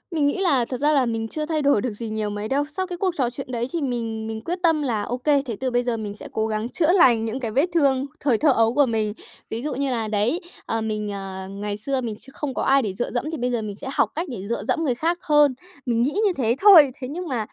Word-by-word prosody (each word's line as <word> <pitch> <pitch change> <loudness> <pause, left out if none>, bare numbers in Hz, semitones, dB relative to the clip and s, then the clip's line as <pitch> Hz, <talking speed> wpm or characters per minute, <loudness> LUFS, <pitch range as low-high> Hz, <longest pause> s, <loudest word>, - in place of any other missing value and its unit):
Mình 290 -2 +3
nghĩ 285 - 0
là 280 -10 +3
thật 255 +1 -5
ra 300 +1 +3
là 275 -3 +3
mình 225 -1 -2
chưa 305 +6 -3
thay 310 -1 -1
đổi 280 -7 +3
được 235 -2 -2
gì 225 +1 -6
nhiều 215 -1 -2
mấy 205 +1 -4
đâu. 275 +4 +1
Sau 340 +6 -4
cái 355 -1 -5
cuộc 370 -1 0
trò 255 -4 +1
chuyện 255 +1 -7
đấy 240 -1 -2
thì 335 - -1
mình 230 -4 -3
mình 220 0 -5
quyết 350 +9 -3
tâm 325 -3 +3
là, 235 -7 -1
ô 240 +4 -3
kê, 285 +2 +2
thế 235 -4 -4
từ 260 0 -1
bây 245 0 +1
giờ 240 -2 -1
mình 210 -2 -5
sẽ - - -9
cố 220 0 0
gắng 215 +1 -2
chữa 320 +4 +2
lành 240 - +5
những 225 +4 -3
cái 230 -4 -3
vết 275 +8 +3
thương 275 -5 +3
thời 260 -6 +2
thơ 295 +5 +4
ấu 225 -2 +3
của 290 +1 +4
mình. 220 -3 0 0.4
Ví 225 - -3
dụ 295 -1 -2
như 275 0 -1
là, 225 -3 -1
đấy, 215 - 0 0.2
ờ, 225 - -1
mình, 215 -1 -2
ờ, 190 -1 -6
ngày 205 +1 -4
xưa 265 +5 -2
mình 225 -3 -4
chưa 270 - -14
không 290 -3 -3
có - - -2
ai 275 +1 +4
để 210 -6 -3
dựa 225 +6 -3
dẫm 245 - -2
thì 320 - -4
bây 250 0 -1
giờ 235 -2 0
mình 210 -2 -5
sẽ - - -6
học - - +2
cách 335 +4 -2
để 200 -6 -6
dựa 235 -3 -2
dẫm 325 - +1
người 260 -6 +1
khác 335 +7 0
hơn. 295 -3 +4 0.3
Mình 235 -2 +1
nghĩ 260 +5 +2
như 395 - +3
thế 235 -3 +2
thôi. 345 -9 +9
Thế 255 - -3
nhưng 345 +6 -5
mà 240 -7 -2
245 Hz, 300 wpm, -23 LUFS, 220-290 Hz, 0.4 s, thôi